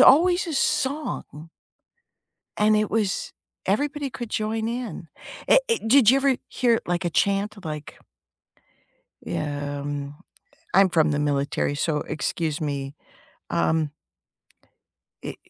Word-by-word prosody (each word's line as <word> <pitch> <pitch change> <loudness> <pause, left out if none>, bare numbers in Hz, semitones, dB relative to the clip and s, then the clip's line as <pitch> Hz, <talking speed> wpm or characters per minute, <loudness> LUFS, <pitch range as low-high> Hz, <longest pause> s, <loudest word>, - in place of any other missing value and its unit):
always 350 +5 +6
a 320 - -3
song 270 - -1 1.1
and 215 0 +4
it 215 -1 +1
was 210 -3 -1 0.3
everybody 285 +7 0
could 240 -3 -6
join 220 +1 -1
in. 235 -8 -5 0.4
Eh, - - +7
eh, 460 - +3
did 240 -1 +6
you 270 - +6
ever 275 -1 +3
hear, 235 -3 +2
like, 175 0 -1
a - - +1
chant 200 +2 0
like 150 -2 -6 1.3
Yeah, 145 -1 -3
um, 145 0 -5 0.6
I'm 195 -1 +6
from 160 -3 +3
the 145 - 0
military, 145 0 0
so 155 +1 0
excuse 155 0 -2
me, 140 -1 -3 0.5
um 155 -2 +1 1.3
i - - -5
195 Hz, 120 wpm, -24 LUFS, 150-245 Hz, 1.3 s, Eh